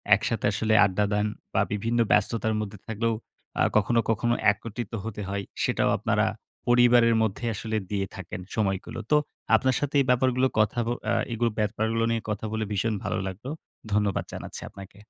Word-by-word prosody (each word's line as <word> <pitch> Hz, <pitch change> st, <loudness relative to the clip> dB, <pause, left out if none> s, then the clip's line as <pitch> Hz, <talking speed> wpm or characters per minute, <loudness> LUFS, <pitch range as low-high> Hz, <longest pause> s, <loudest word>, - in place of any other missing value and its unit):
একসাথে -, -, -2 dB
আসলে 110 Hz, 0 st, +1 dB
আড্ডা 100 Hz, +1 st, +1 dB
দেন 105 Hz, +1 st, +2 dB, 0.3 s
বা 95 Hz, -, +3 dB
বিভিন্ন 115 Hz, +3 st, 0 dB
ব্যস্ততার 110 Hz, +1 st, +2 dB
মধ্যে 105 Hz, -1 st, -6 dB
থাকলেও 115 Hz, +1 st, 0 dB, 0.5 s
আ -, -, +3 dB, 0.2 s
কখনো, 115 Hz, +3 st, +3 dB
কখনো 120 Hz, +2 st, +2 dB, 0.2 s
একত্রিত 110 Hz, +1 st, -6 dB
হতে 110 Hz, -2 st, -5 dB
হয়। 100 Hz, 0 st, -2 dB, 0.2 s
সেটাও -, -, +2 dB
আপনারা -, -, +1 dB, 0.4 s
পরিবারের 120 Hz, -1 st, +5 dB
মধ্যে 110 Hz, +2 st, -2 dB
আসলে 110 Hz, +1 st, -2 dB
দিয়ে 100 Hz, -1 st, 0 dB
থাকেন, 95 Hz, -1 st, -7 dB
সময়গুলো। 110 Hz, +2 st, -1 dB
তো 150 Hz, -, +7 dB, 0.4 s
আপনার 130 Hz, -1 st, +2 dB
সাথে 145 Hz, 0 st, -2 dB
এই -, -, 0 dB
ব্যাপারগুলো 130 Hz, +1 st, +3 dB
কথা 110 Hz, +2 st, +2 dB
ব -, -, 0 dB, 0.2 s
আ -, -, +3 dB, 0.2 s
এগুলো 115 Hz, +1 st, +1 dB
ব্যাপারগুলো 110 Hz, +2 st, 0 dB
নিয়ে 115 Hz, -1 st, 0 dB
কথা 105 Hz, +1 st, -2 dB
বলে, 110 Hz, 0 st, -1 dB
ভীষণ 110 Hz, +2 st, 0 dB
ভালো -, -, -1 dB
লাগলো। 105 Hz, +8 st, -6 dB, 0.4 s
ধন্যবাদ 105 Hz, -2 st, +1 dB
জানাচ্ছি -, -, -6 dB
আপনাকে। 100 Hz, +1 st, -12 dB
110 Hz, 165 wpm, -26 LUFS, 105-120 Hz, 0.5 s, তো